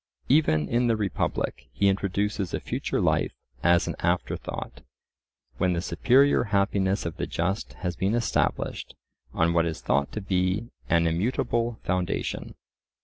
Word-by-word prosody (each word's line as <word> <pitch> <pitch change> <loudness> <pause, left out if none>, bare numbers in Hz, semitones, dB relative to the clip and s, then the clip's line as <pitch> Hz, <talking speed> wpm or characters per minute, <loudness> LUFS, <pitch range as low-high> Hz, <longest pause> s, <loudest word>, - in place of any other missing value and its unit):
Even 125 - +3
in 120 +1 +2
the 115 - +3
Republic 95 - -2
he 70 +11 +2
introduces 100 -1 0
a - - -2
future - - -2
life - - +1 0.3
as 85 0 +4
an - - -2
afterthought, - - -2 0.8
when 90 -1 +2
the 85 - 0
superior 130 +7 +3
happiness 100 -1 +1
of 85 +1 -4
the - - -2
just 95 +5 -2
has 90 -1 -4
been 100 +4 0
established 120 -1 -1 0.4
on 85 +1 +2
what 85 -1 +3
is 80 - -4
thought 70 0 0
to - - -4
be 95 +4 0 0.2
an 85 -1 +4
immutable 115 +6 0
foundation. 90 -1 -2
95 Hz, 145 wpm, -26 LUFS, 85-110 Hz, 0.8 s, as